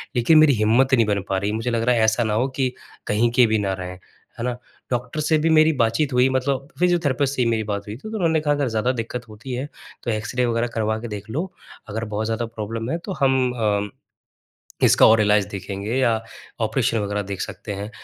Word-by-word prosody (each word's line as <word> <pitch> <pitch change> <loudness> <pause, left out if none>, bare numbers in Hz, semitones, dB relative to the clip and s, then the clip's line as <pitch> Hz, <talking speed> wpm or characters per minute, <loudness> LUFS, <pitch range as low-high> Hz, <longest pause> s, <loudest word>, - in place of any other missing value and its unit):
लेकिन 120 +7 +5
मेरी 155 -2 +6
हिम्मत 120 +4 +3
नहीं 115 -3 +5
बन 100 -1 0
पा 95 - +1
रही। 100 +2 -1
मुझे 115 +3 -2
लग 115 -1 0
रहा 125 +1 +3
है 115 - +2
ऐसा 110 +2 +2
ना 110 -2 -1
हो 120 +5 +1
कि 130 -2 +1 0.4
कहीं 110 +3 +2
के 125 -1 +6
भी 110 0 +2
ना 100 -2 -1
रहें, 90 -1 -6 0.5
है - - -3
ना। 125 -1 -2 0.3
डॉक्टर 125 +4 -2
से 155 +1 +2
भी 155 +2 +1
मेरी 155 0 +5
बातचीत 125 +5 0
हुई, 125 +1 +4
मतलब 130 +1 -1
फ़िजियोथेरेपिस्ट 145 -6 +1
से 130 - 0
ही 120 - +2
मेरी 110 -1 0
बात 100 -1 -4
हुई 105 - -5
थी, - - -12
तो - - -8
उन्होंने 165 -4 +2
कहा 150 -1 +2
अगर 145 -2 0
ज़्यादा 110 +2 0
दिक्कत 120 0 -5
होती 115 +5 -8
है 130 +3 -3 0.4
तो 120 - -1
एक्स-रे 110 +4 -1
वग़ैरह 115 0 0
करवा 110 -1 0
के 120 - -5
देख 105 0 -7
लो। 165 +11 -3 0.4
अगर 110 +2 -3
बहुत 110 +1 -1
ज़्यादा 115 +1 -1
प्रॉब्लम 115 +1 -5
है, 165 - 0
तो 190 +3 -6
हम 130 -2 +3
अम 105 -1 +1 1.0
इसका - - +6
और 110 0 +6
इलाज 105 -1 +3
देखेंगे 100 +2 -4
या 130 -3 +3 0.5
ऑपरेशन 115 - +1
वग़ैरह 105 0 -2
देख 100 -1 -6
सकते 105 - -5
हैं। 100 +2 -6
115 Hz, 230 wpm, -22 LUFS, 105-130 Hz, 1.0 s, मेरी